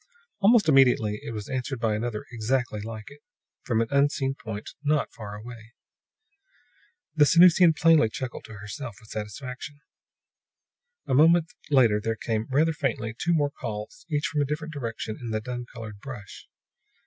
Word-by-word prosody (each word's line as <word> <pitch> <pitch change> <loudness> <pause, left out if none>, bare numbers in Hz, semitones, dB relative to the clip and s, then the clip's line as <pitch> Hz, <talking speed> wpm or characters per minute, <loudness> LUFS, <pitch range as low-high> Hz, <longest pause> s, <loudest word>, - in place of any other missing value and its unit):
Almost 210 -1 +5
immediately 125 -7 +4
it - - -5
was 105 -2 -6
answered 130 -1 -3
by 115 -2 +1
another 110 0 -3
exactly 120 -1 -1
like 110 +2 -8
it, 145 +1 -15 0.4
from 115 -3 0
an 115 - 0
unseen 140 -1 +2
point 110 -4 -7
not 150 0 +1
far 105 -2 -8
away. 115 +1 -11 1.4
The 150 - +6
Sanusian 170 +1 +7
plainly 160 -8 +5
chuckled 125 +2 -6
to 110 - -10
herself 105 +3 -7
with 115 - -16
satisfaction. 125 +7 -6 1.3
A - - -2
moment 160 +4 +5 0.2
later 120 -7 +4
there 115 +1 -1
came, 110 0 -2
rather 155 +5 +3
faintly, 115 -6 -2
two 170 +7 +1
more 145 -2 +1
calls, 105 +7 -7
each 150 -1 0
from 150 - 0
a - - +2
different 155 +2 -4
direction 115 -5 -5
in 120 - -5
the 110 -1 -1
dun 120 +2 -6
colored 110 -3 -9
brush. 110 -5 -10
125 Hz, 160 wpm, -26 LUFS, 110-145 Hz, 1.4 s, Sanusian